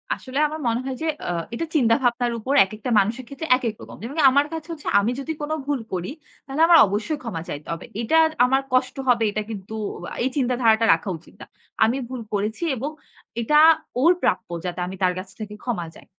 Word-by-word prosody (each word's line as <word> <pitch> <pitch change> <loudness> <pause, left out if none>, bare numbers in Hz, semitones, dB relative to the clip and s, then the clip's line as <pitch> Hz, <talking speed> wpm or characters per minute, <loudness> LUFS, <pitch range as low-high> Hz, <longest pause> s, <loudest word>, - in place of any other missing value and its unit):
আসলে 260 +2 -5
আমার 310 +1 -6
মনে 230 0 +1
হয় 265 - -3
এ্যাঁ 290 - -2
এটা 235 - -2
চিন্তা 230 -6 +4
ভাবনার 245 0 +1
উপর 255 +5 -2
একেকটা 215 +5 -7
মানুষের 225 +6 -1
ক্ষেত্রে 280 +5 -6
একেক 235 -4 -2
রকম। - - -11
যেমন 265 +7 -6
আমার 280 +2 +3
কাছে 320 -1 -6
হচ্ছে 310 -3 -8
আমি 210 +4 0
যদি 275 +4 -4
কোন 295 +1 -4 0.2
ভুল 290 -2 0
করি, 180 +5 -3 0.3
তাহলে 275 +3 -2
আমার 335 -1 +8
অবশ্যই 215 +10 -2
ক্ষমা 215 -9 -4
চাইতে 145 +1 -6
হবে। 165 - -7 0.2
এটা 275 +8 +2 0.3
আমার 265 +2 +2
কষ্ট 255 0 +2
হবে, 240 -2 +4
এটা 215 - -2
কিন্তু 205 -1 -7 0.5
এই 260 - +1
চিন্তাধারাটা 240 -4 +3
রাখা 165 +4 -2
উচিত 160 - -20
না। - - -8 0.4
আমি 230 +4 +2
ভুল 255 -2 -5
করেছি 210 +8 -2
এবং 265 +4 -3 0.5
এটা, 300 +6 +4 0.4
ওর 335 +4 +6
প্রাপ্য - - 0 0.2
যাতে 180 0 -4
আমি 190 - -6
তার 180 0 +3
কাছ 190 - -8
থেকে 210 -1 -6
ক্ষমা 205 -9 -2
চাই। - - -15
240 Hz, 200 wpm, -23 LUFS, 210-275 Hz, 0.5 s, আমার